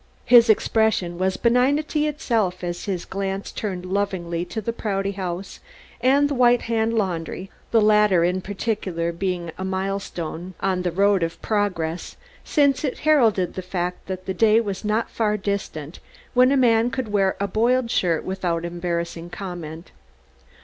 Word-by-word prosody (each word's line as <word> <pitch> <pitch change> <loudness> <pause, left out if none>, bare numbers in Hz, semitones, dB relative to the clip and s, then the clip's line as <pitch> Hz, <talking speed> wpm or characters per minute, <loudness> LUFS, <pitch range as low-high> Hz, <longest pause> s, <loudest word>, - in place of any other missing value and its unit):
His 235 -1 +7
expression 215 -5 +2
was 190 0 0
benignity 285 +6 +2
itself 225 - -1
as 175 0 -4
his 185 -4 -3
glance 195 0 -4
turned 185 -4 -4
lovingly 185 -3 -2
to 220 - -5
the 230 +2 -3
Prouty 200 -3 -2
House 185 -1 -5 0.4
and 275 +3 +4
the 285 - -2
White 245 -2 +4
Hand 230 0 0
Laundry 185 -2 -2 0.2
the 230 - +4
latter 210 -4 +4
in 180 +2 +1
particular 190 -4 -2
being 175 -1 -3
a - - -3
milestone 190 -2 -4
on 190 -1 0
the 180 - 0
road 200 +2 +3
of 165 0 -2
Progress 180 -6 -2 0.3
since 280 -2 +2
it 275 - -3
heralded 230 - +3
the 185 - -4
fact 180 -1 -4
that 185 -1 -5
the 190 - -2
day 220 +3 +4
was 200 -3 -3
not 215 +2 0
far 210 -2 0
distant 190 -6 -4 0.3
when 255 +1 +5
a 280 - +3
man 230 -2 +4
could 240 -1 -4
wear 195 -2 +2
a 200 - 0
boiled 235 +4 +1
shirt 170 -7 +1
without 175 -3 -2
embarrassing 170 -1 -3
comment. 175 -3 -7
195 Hz, 155 wpm, -23 LUFS, 180-225 Hz, 0.4 s, His